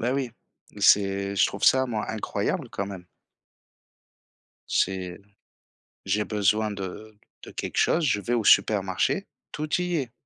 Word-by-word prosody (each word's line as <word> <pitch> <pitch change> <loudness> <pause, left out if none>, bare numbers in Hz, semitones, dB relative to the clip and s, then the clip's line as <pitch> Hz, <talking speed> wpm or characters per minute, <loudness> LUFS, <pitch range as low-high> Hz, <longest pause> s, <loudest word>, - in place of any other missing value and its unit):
Bah 120 +3 0
oui, 135 -3 -1 0.5
c'est 100 0 +3
je - - +5
trouve - - -4
ça 130 0 +5
moi 110 -4 -3
incroyable 110 -1 -2
quand 100 - -3
même. 95 -3 -8 1.7
C'est 95 -1 -1 0.9
j'ai 105 +2 0
besoin 105 +1 +1
de 105 +2 -7 0.3
de - - -10
quelque - - -5
chose, 165 - +3
je 115 -8 +2
vais 120 +4 -2
au 115 - +1
supermarché, 100 - +3 0.3
tout 155 +3 -1
y 180 -1 -1
est. 130 -5 -3
105 Hz, 140 wpm, -26 LUFS, 100-125 Hz, 1.7 s, je